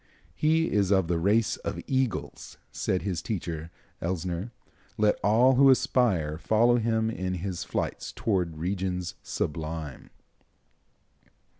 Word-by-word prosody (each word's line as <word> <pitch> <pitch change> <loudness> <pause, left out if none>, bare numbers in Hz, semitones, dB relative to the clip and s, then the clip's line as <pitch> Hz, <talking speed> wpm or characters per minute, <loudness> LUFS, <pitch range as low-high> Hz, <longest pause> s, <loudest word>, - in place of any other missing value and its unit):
"He 160 +2 +2
is 100 -3 +2
of 95 -4 +3
the 85 0 0
race 110 +6 +2
of - - -5
eagles," 130 -4 -2
said 90 - -1
his 90 -5 -2
teacher, 85 -6 -4 0.3
Elsner. 90 +3 -2 0.5
"Let 105 -1 +2
all 120 +5 +5
who 135 0 +7
aspire 115 - +2
follow 120 +5 +3
him 110 -1 +1
in 95 -3 -3
his 90 0 -4
flights - - -3
toward 90 -7 -1
regions 90 0 -2
sublime." 80 -2 -4
95 Hz, 120 wpm, -27 LUFS, 85-115 Hz, 0.5 s, who